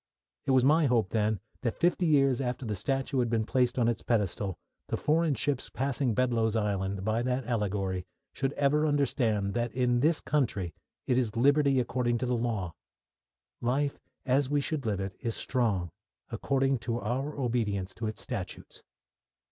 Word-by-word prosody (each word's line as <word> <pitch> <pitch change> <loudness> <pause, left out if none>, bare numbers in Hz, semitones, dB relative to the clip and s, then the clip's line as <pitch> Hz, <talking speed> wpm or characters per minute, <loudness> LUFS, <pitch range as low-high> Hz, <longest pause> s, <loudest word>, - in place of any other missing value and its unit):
It - - -1
was 130 -1 +5
my 155 +2 +5
hope 115 -7 +2
then 110 -2 +1 0.2
that 120 -4 -2
fifty 175 +1 +2
years 135 -4 +3
after 125 0 -3
the 105 -2 -2
statue 135 +5 -1
had 120 -2 +1
been 110 -1 +1
placed 125 0 +1
on 120 -2 +3
its 120 - 0
pedestal 100 -4 -1 0.3
the - - -1
foreign 160 -1 +2
ships 135 +2 -1
passing 130 -2 -1
Bedloe's 115 -3 +1
Island, 100 -2 -1
by 110 +2 +1
that 125 +1 -1
allegory, 100 -5 -1 0.3
should 135 0 -1
ever 150 +2 +2
understand 120 -8 +1
that 120 -1 -1
in 125 -1 +2
this 155 +4 +3
country 105 - -1 0.3
it 125 0 +2
is 115 -4 -1
liberty 140 +2 +4
according 120 -1 0
to 125 - -2
law. 115 -8 -1 0.9
Life, 140 +4 0 0.3
as 135 +1 +2
we 145 0 +2
should 140 -3 -2
live 100 -3 0
it, 95 -1 -4
is 115 -3 -3
strong, 100 -9 0 0.4
according 135 +3 +1
to 115 0 -2
our 130 +8 -2
obedience 105 -7 -1
of 110 - 0
its 110 - -5
statutes. - - -6
120 Hz, 165 wpm, -29 LUFS, 110-135 Hz, 0.9 s, was